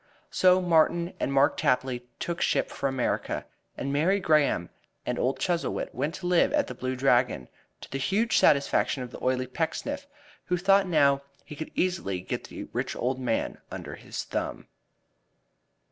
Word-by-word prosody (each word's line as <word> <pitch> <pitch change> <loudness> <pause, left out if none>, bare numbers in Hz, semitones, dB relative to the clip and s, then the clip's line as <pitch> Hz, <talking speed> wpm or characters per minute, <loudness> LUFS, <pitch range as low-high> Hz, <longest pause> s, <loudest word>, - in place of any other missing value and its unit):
So 185 0 +5
Martin 170 +1 +3
and - - -1
Mark 135 +1 +3
Tapley 125 -1 0
took 170 -1 -3
ship - - +1
for 140 - -1
America, 130 -2 -1 0.3
and 140 +1 -2
Mary 175 +8 +3
Graham 150 - +2 0.3
and - - -2
old 130 +2 +1
Chuzzlewit 175 -2 -1
went 145 +6 -2
to 190 - -8
live 175 +5 +3
at 295 -1 +3
The - - -7
Blue 130 0 -3
Dragon, 125 - +2 0.3
to - - -11
the 135 - -2
huge 210 - +2
satisfaction 140 -2 +3
of 125 - -8
the - - -10
oily 130 0 +1
Pecksniff, 275 - -3 0.4
who 180 - 0
thought 195 +2 +4
now 140 -5 +4 0.2
he 150 - -9
could 160 - -6
easily 175 - 0
get 90 - -4
the - - -7
rich - - -2
old 130 +2 -1
man 120 -3 -1
under - - -7
his - - -6
thumb. - - -4
145 Hz, 165 wpm, -27 LUFS, 130-180 Hz, 0.4 s, So